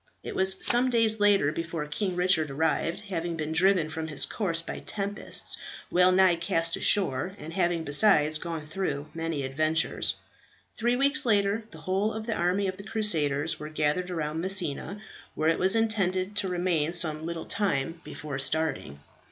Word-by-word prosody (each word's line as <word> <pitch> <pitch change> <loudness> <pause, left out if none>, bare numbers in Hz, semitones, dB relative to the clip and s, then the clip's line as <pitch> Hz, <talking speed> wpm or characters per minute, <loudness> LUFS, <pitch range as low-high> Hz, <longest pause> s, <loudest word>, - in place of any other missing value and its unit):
It - - -6
was 190 0 +3
some 245 +2 +4
days 225 -3 +3
later 200 -8 +3
before 165 -1 -4
King 180 +5 -3
Richard 180 -4 +2
arrived, 160 +3 -1
having 175 -4 -4
been 155 0 -3
driven 180 0 +3
from 160 0 -5
his 155 -3 -1
course 170 -6 -1
by - - -6
tempests, 205 0 -1 0.3
well 180 +1 +5
nigh 185 -2 +4
cast 165 0 0
ashore, 190 -1 +1
and 165 -4 -9
having 175 -3 0
besides 155 -1 +3
gone 165 -2 -5
through 155 -3 -4
many 165 -3 -3
adventures. 155 +4 0 0.6
Three 240 +2 +1
weeks 280 +3 +2
later, 210 -2 +1
the 160 -6 -12
whole 190 +6 -1
of 220 0 -5
the 230 - -1
army 185 +3 0
of 185 0 -4
the 200 - -9
Crusaders 160 -9 0
were 150 - -7
gathered 155 +4 0
around 160 -2 -3
Messina, 190 0 -3 0.4
where 155 +1 +1
it 165 - +1
was 190 +3 +3
intended 200 -3 0
to 200 -2 0
remain 175 -3 0
some 155 -3 +3
little 165 0 -5
time 165 -5 -1
before 150 -2 -6
starting. 135 - 0
170 Hz, 170 wpm, -27 LUFS, 155-200 Hz, 0.6 s, well